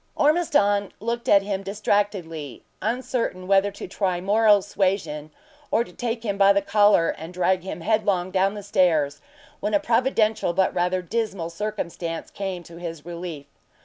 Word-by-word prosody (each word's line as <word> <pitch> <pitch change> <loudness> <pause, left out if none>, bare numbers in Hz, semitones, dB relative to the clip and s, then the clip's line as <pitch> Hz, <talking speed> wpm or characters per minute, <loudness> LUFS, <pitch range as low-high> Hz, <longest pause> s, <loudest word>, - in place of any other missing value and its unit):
Ormiston 285 - +2
looked 235 +2 -3
at 200 -1 +6
him 195 -1 -2
distractedly, 195 - -2 0.2
uncertain 230 -4 -2
whether 195 +1 +3
to - - -7
try 185 -1 -1
moral 205 +1 +4
suasion 185 -7 -1 0.4
or 230 - +2
to - - -15
take 235 -1 -3
him 200 -3 -2
by 200 0 +7
the 200 - +2
collar 205 -5 +4
and 160 +2 -9
drag 180 +1 +1
him 180 -3 -6
headlong 200 -3 +1
down 195 +2 +1
the 205 - -7
stairs, 160 -8 +2 0.4
when 210 +1 0
a - - +4
providential 225 -5 +1
but 190 +1 +2
rather 180 +1 0
dismal 195 -4 -2
circumstance 170 -4 -4
came 190 -3 -4
to 170 0 -13
his 165 -3 -7
relief. 170 -4 -6
195 Hz, 155 wpm, -24 LUFS, 175-210 Hz, 0.4 s, by